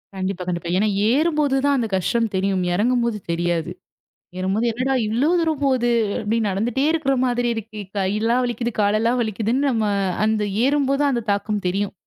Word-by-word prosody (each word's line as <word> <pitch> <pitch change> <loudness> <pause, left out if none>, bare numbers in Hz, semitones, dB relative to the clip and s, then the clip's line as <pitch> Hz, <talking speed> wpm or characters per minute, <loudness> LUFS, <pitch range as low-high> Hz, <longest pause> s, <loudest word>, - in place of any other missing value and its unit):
கண்டிப்பா, 190 -1 -3
கண்டிப்பா. 175 -1 -3
ஏன்னா 215 +3 +2 0.2
ஏறும்போது 300 -1 +2
தான் 285 -1 +3
அந்த 235 -3 0
கஷ்டம் 225 +4 0
தெரியும். 190 -1 0
இறங்கும்போது 235 +2 +1
தெரியாது. 170 0 -1 0.7
ஏறும்போது 195 +5 0
என்னடா 255 +4 -1
இவ்வளவு 265 +11 +1
தூரம் 320 -3 0
போது, 255 -3 +2 0.3
அப்டி 220 +2 0
நடந்துட்டே 230 +8 0
இருக்கிற 300 -4 +1
மாதிரி 245 -1 0
இருக்கே. 215 -1 -7 0.2
கைலாம் 215 +6 +1
வலிக்குது, 240 0 -2
காலல்லாம் 220 +4 +2
வலிக்குதுன்னு 230 +5 0
நம்ம 220 -3 0 0.4
அந்த 215 -1 +1 0.2
ஏறும்போது 275 0 +1
அந்தத் 235 -5 -2
தாக்கம் 205 0 -1
தெரியும். 200 +2 -1
225 Hz, 150 wpm, -21 LUFS, 200-260 Hz, 0.7 s, தான்